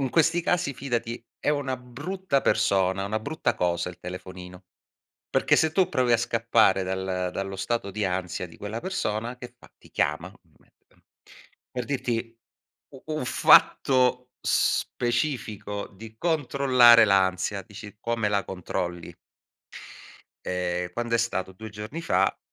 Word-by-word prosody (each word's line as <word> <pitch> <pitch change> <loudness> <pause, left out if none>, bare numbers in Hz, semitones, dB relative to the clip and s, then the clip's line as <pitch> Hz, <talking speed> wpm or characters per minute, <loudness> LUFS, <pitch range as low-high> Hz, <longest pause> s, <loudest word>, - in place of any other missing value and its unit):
In 135 -2 -1
questi 165 +3 +3
casi 170 -5 0
fidati 120 -3 -3
è - - -3
una 140 -3 -1
brutta 140 +6 -2
persona, 95 0 +2
una 110 +2 -2
brutta 155 +9 -1
cosa 85 0 0
il 90 - -10
telefonino. 90 0 -9 0.6
Perché - - +3
se 160 -1 +2
tu 185 +2 +3
provi 125 -3 +1
a - - +6
scappare 115 -4 +2
dal 95 -1 -2
dallo 95 0 -4
stato 100 +1 -2
di 105 +1 -2
ansia 90 -1 -2
di 85 - -15
quella 105 +3 -5
persona, 115 - -3
che 125 0 -10
fa? - - -18
Ti - - -20
chiama, - - -1 0.2
ovviamente, - - -31
ehm, - - -29 0.7
per 125 -1 -4
dirti, 115 -3 -3 0.6
u 135 - -12
un 155 -3 -3
fatto 125 -1 +4
specifico 110 -5 -1
di 110 +3 -12
controllare 130 -6 +5
l'ansia, 95 0 +2
dici: 105 +2 -11
"Come 115 -2 0
la 100 -1 0
controlli?" 90 -2 -4 1.3
Ehm, 90 -1 -2
quando 120 +3 -2
è - - +6
stato? 95 -5 -1
2 110 +3 -9
giorni 105 +10 -7
fa, 95 - +1
115 Hz, 140 wpm, -26 LUFS, 95-125 Hz, 1.3 s, a